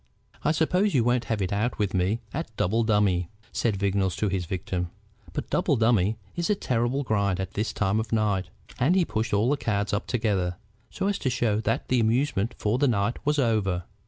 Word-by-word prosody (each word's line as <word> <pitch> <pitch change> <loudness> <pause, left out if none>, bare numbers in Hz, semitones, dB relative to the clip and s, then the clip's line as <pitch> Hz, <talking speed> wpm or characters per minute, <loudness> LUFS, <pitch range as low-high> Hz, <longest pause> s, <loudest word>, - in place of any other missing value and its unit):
"I 150 - +3
suppose 180 +4 +2
you 125 - +4
won't 120 0 +1
have 110 -3 -1
it 95 +2 -2
out 110 +4 0
with 100 -2 -1
me 95 +5 +1
at 140 -8 -5
double 110 +6 +2
dummy?" 100 -6 +2 0.2
said 115 -4 0
Vignolles 95 -1 +1
to 105 - 0
his 95 -2 -1
victim. 90 -1 -3 0.4
"But - - -5
double - - +2
dummy 110 -2 +2 0.2
is 170 +2 -1
a 210 - +4
terrible 125 -2 0
grind 100 -5 0
at 95 -1 -3
this 105 +3 -2
time 100 +1 +1
of 110 -1 -4
night." 105 -4 +1 0.3
And 140 +9 +3
he 185 -3 +3
pushed 110 -3 -2
all 105 +6 +2
the 145 - +2
cards 105 -5 -1
up 105 - -1
together, 100 -7 0 0.3
so - - -3
as 200 -1 0
to 130 - 0
show 115 -4 +1
that 115 +1 -1
the 125 - +3
amusement 115 -1 +1
for 110 +4 0
the 145 - +4
night 110 -1 0
was 150 0 +3
over. 105 -9 +1
110 Hz, 210 wpm, -26 LUFS, 100-125 Hz, 0.4 s, you